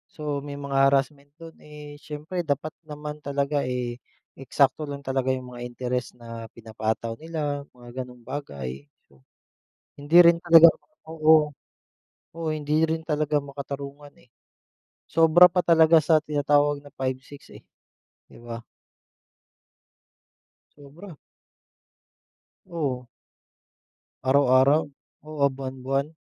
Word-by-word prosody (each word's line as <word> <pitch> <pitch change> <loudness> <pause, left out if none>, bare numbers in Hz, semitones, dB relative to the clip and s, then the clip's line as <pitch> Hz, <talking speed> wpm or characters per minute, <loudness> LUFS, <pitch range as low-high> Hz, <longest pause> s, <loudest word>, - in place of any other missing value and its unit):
So 150 -2 -3
may 140 0 -8
mga 135 -1 +2
harassment 140 +1 -1
dun. 165 -1 -11
Eh, 150 -1 -11
siyempre 155 +4 -5
dapat 155 -1 -3
naman 150 -1 -8
talaga 140 0 -1
eh, 125 -1 -4 0.3
eksakto 140 +2 0
lang 140 -1 -7
talaga 130 -1 -1
yung 130 -1 -3
mga 120 - -9
interes 125 0 -4
na 115 -1 -9
pinapataw 110 0 -4
nila 150 -3 -3 0.2
mga 120 +1 -8
ganoong 125 -2 -12
bagay. 70 - -7 0.2
So, 70 -1 -26 0.8
hindi 145 +4 +2
rin 170 -1 +6
talaga 170 -1 +8 0.4
oo. 155 -1 +4 0.8
Oo, 165 -1 -4
hindi 155 +2 +1
rin 160 0 -2
talaga 150 -1 -1
makatarungan 140 +1 -8
eh. - - -27 0.7
Sobra 165 +2 +5
pa 180 - +1
talaga 165 -1 +5
sa 155 0 +2
tinatawag 145 -1 +1
na 145 0 -16
5-6 130 +2 -6
eh. - - -12 0.7
'Di - - -16
ba? 115 0 -8 2.2
Sobra. 155 +6 -13 1.5
Oo. 135 -7 -3 1.2
Araw-araw. 135 +2 +4 0.4
Oo, 155 0 -9
ah, - - -2
buwan-buwan. 135 +2 -3
145 Hz, 115 wpm, -25 LUFS, 130-155 Hz, 2.2 s, talaga